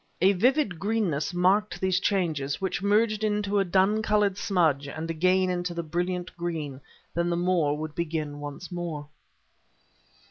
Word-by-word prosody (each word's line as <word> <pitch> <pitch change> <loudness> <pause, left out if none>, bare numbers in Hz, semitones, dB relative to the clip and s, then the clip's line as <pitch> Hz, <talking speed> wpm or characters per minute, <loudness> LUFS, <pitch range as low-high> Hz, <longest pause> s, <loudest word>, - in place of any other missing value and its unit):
A 190 +3 +5
vivid 240 - +2
greenness 195 -8 0
marked 190 +4 +2
these 185 -1 +1
changes, 160 -9 0
which 190 -1 -2
merged 215 +1 +2
into 205 -1 +1
a - - +4
dun 195 +4 +2
colored 210 -2 +2
smudge 160 -8 +1
and 160 +3 -4
again 185 +3 +2
into 175 -1 -2
the 170 - -2
brilliant 175 +2 -3
green; 155 -6 -4 0.3
then 170 +1 0
the 170 - 0
moor 170 -5 +1
would 155 0 -5
begin 155 -3 -3
once 145 +5 -7
more. 165 -4 -5
180 Hz, 150 wpm, -27 LUFS, 160-200 Hz, 0.3 s, A